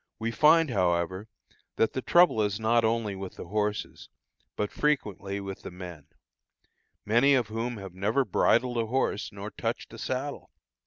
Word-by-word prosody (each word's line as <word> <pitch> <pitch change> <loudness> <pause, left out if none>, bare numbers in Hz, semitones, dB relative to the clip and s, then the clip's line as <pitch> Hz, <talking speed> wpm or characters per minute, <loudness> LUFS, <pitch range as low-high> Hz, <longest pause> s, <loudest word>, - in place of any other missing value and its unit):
We 115 +1 -2
find, 155 +5 +5
however, 90 0 0 0.5
that 115 - +1
the 130 - -2
trouble 175 -7 +4
is 105 0 0
not 115 +1 +3
only 110 -2 0
with 95 -1 -7
the - - -8
horses, 105 0 -2 0.5
but 105 - -2
frequently 105 -9 -1
with 95 -1 -7
the - - -7
men, 90 -4 -10 1.0
many 120 +6 +4
of 120 -5 0
whom 115 +2 -3
have 95 -3 -8
never 105 +8 +1
bridled 120 +4 +2
a 115 - 0
horse 115 -3 -1
nor 100 +1 -7
touched - - -4
a - - -9
saddle. 135 +3 -4
110 Hz, 160 wpm, -28 LUFS, 100-125 Hz, 1.0 s, find